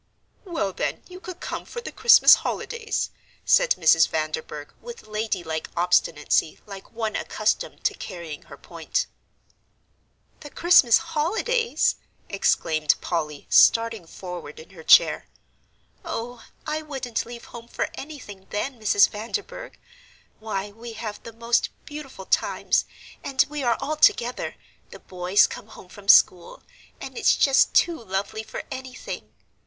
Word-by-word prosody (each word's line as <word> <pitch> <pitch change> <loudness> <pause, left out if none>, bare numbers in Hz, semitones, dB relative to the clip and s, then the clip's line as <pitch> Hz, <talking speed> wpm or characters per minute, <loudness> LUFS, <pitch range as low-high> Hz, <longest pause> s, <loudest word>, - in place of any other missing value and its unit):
"Well, 320 - -2
then, - - -3
you 365 0 -11
could 370 -1 -9
come - - -5
for 475 - -8
the 470 - -7
Christmas 465 +2 +7
holidays," 455 -1 -3 0.3
said - - +4
Mrs. 165 -1 +4
Vanderburgh, 155 -1 -4
with 475 -1 -10
ladylike 195 -7 -3
obstinacy 170 -3 +1
like 195 -2 -11
one 225 -2 -3
accustomed - - -2
to - - +1
carrying 170 -6 -8
her - - -11
point. - - -3 1.3
"The 290 - -10
Christmas 310 -8 +5 0.2
holidays!" 450 +9 +1 0.3
exclaimed 155 -6 +1
Polly, 150 -4 -3
starting 230 -6 +4
forward 175 -4 -8
in 160 - -14
her 175 -4 -12
chair. - - +5 0.8
"Oh, 245 -8 -6 0.2
I 310 0 -2
wouldn't 265 -7 -4
leave 235 0 -9
home 235 -1 -9
for - - -2
anything, 230 -10 -10
then, 240 +4 -3
Mrs. 205 -1 +5
Vanderburgh. 410 - -6 0.6
Why, 205 -2 -4
we 230 +2 -10
have 220 -2 -6
the 230 - -10
most 230 +1 0 0.2
beautiful 290 -9 -9
times, - - +1 0.4
and 265 -1 +2
we 300 -1 -4
are 240 -3 +1
all 305 +3 -3
together 245 -4 +2 0.3
the - - -11
boys 185 +2 +2
come - - -8
home 205 -4 -14
from 200 +1 -14
school 180 -3 +4 0.4
and - - -8
it's - - +4
just 270 -1 +3
too 335 -8 +2
lovely 200 +2 -3
for 220 - -7
anything!" 260 -1 -8
225 Hz, 135 wpm, -24 LUFS, 185-295 Hz, 1.3 s, Christmas